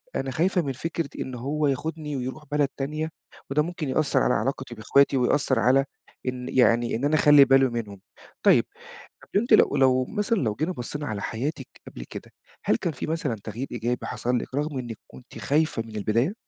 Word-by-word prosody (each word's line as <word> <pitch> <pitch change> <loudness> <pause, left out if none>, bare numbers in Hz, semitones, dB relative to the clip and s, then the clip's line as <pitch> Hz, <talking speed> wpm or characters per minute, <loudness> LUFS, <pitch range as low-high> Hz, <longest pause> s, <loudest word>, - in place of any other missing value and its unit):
أنا 135 -1 -2
خايفة 180 +6 +1
من 135 -4 -3
فكرة 165 +1 -3
إن 130 - -4
هو 145 +5 -1
ياخدني 150 +2 -3
ويرُوح 130 +5 -5
بلد 145 -1 +2
تانية، 155 +3 -2 0.4
وده 150 +2 +2
ممكن 165 -3 -4
يأثّر 150 +2 +2
على - - +3
علاقتي 130 0 -2
بإخواتي 135 +5 +3
ويأثّر 125 +3 +2
على 135 +2 +4 0.4
إن 125 0 -3
يعني، 120 -2 +3
إن 130 +5 -1
أنا 155 +2 +2
أخلّي 145 -2 +7
باله 135 0 +5
منهم." 105 -5 -5 0.4
طيب، - - +6 0.6
طَب - - -17
أنتِ 240 - -1
لو 145 - +5
لو 130 -1 +4
مثلًا 210 - -1
لو 110 - 0
جينا 155 +9 -1
بصّينا 145 +1 -5
على 105 -4 -4
حياتِك 135 +3 -3 0.2
قبل - - -9
كده، - - -9 0.3
هل 110 - +3
كان 170 +4 -2
فيه - - -5
مثلًا 155 -7 -2
تغيير 115 +5 -5
إيجابي 120 +1 -2
حصَل 125 +1 -1
لِك 130 - -7
رغم 145 -1 -1
إنِك 120 -3 -6
كنتِ 130 - -13
خايفة 150 -5 +1
من 110 -1 -10
البداية؟ 115 - +1
135 Hz, 190 wpm, -25 LUFS, 120-150 Hz, 0.6 s, أخلّي